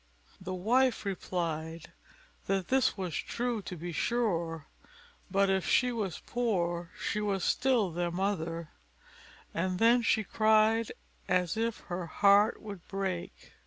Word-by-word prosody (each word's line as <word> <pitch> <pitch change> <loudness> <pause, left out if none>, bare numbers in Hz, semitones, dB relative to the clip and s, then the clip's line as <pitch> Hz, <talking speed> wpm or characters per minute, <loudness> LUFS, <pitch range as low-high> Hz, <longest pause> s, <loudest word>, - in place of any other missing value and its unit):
The 185 0 -4
wife 240 +6 +2
replied 165 -4 -3 0.6
"that 195 -2 0
this 260 -4 +2
was 185 -4 -3
true, 240 -2 -2
to 185 - -7
be 175 +2 -5
sure; 170 -7 -1 0.6
but 195 +1 +3
if 190 -1 +1
she 250 -1 +3
was 210 -7 -3
poor, 175 -8 -1
she 210 - -1
was 200 -3 -1
still 240 -8 +2
their 175 +1 -1
mother;" 170 -3 -2 0.8
and 185 +2 -1
then 235 +4 +5
she 220 -1 +2
cried 220 +1 +3 0.4
as 180 +1 +1
if 225 0 -1
her 175 -1 -5
heart 205 +6 +4
would 200 -5 -8
break. 190 -2 -4
195 Hz, 130 wpm, -30 LUFS, 175-220 Hz, 0.8 s, then